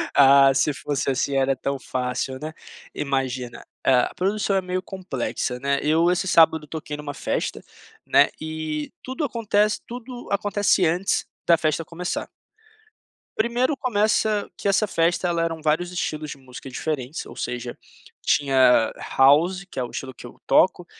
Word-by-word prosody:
Ah, 135 0 +7
se 145 +2 +2
fosse 140 0 -2
assim 135 +2 -1
era 135 0 +2
tão 140 +1 -3
fácil, 130 +1 -3
né, 155 +1 -5 0.4
imagina. 130 -3 -3 0.2
A 125 -2 +3
produção 200 +1 0
é 190 - +2
meio 185 0 -3
complexa, 135 -9 -4
né. 140 +1 0
Eu 165 +4 +3
esse 185 +1 0
sábado 160 -3 +4
toquei 150 -1 -6
numa 145 -1 -6
festa, - - -3 0.5
né, - - +5
e 155 -1 -4
tudo 260 +5 -4
acontece 215 -4 +1
tudo 245 +1 -8
acontece 200 -2 +2
antes 180 +5 +1 0.2
da 170 -1 +6
festa 155 0 -1
começar. 175 +2 -4 1.1
Primeiro, 240 +5 +1
começa 215 -4 +1
que - - -4
essa 200 +2 +3
festa, 175 0 +1
ela 170 -1 0
eram 165 -1 -2
vários 160 +3 0
estilos 155 -4 -3
de 145 - -7
música 130 0 -11
diferentes, 140 +1 -4
ou - - -11
seja, 120 0 -4 0.5
tinha 130 -5 +4 0.3
house, 165 +8 +4
que - - -6
é - - 0
o 120 - -5
estilo 130 -1 -6
que - - -12
eu - - -16
toco, - - +3
155 Hz, 155 wpm, -23 LUFS, 135-190 Hz, 1.1 s, Ah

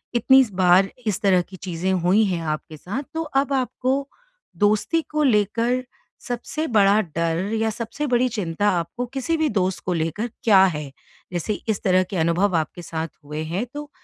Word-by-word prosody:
इतनी 265 +3 +6
बार 185 +1 +4 0.2
इस 205 -3 -1
तरह 190 -3 +4
की 185 +2 -11
चीज़ें 185 0 -3
हुई 185 +4 +3
हैं 180 -4 -1
आपके 155 0 -4
साथ, 205 - -5
तो 325 - -2
अब 280 -2 0
आपको 265 +1 -1 0.5
दोस्ती 215 +10 +2
को 305 0 +1
लेकर 235 +1 +2 0.4
सबसे 245 +6 -3
बड़ा 205 -3 +4 0.2
डर 170 +3 0
या 225 - +2
सबसे 230 +6 -4
बड़ी 250 -1 +2
चिंता 205 -2 -1
आपको 175 +9 -3
किसी 270 +6 -2
भी 315 -1 +1
दोस्त 190 -3 0
को 180 - 0
लेकर 165 +8 -2
क्या 200 -4 +6
है? 150 -6 -3 0.4
जैसे 175 +4 -1 0.2
इस 215 - 0
तरह 185 -1 +4
के 185 +1 -5
अनुभव 170 +4 +2
आपके 160 +2 -3
साथ 160 -1 -4 0.2
हुए 150 +2 -5
हैं, 175 +8 -2
तो 295 0 -7
200 Hz, 175 wpm, -23 LUFS, 175-245 Hz, 0.5 s, इतनी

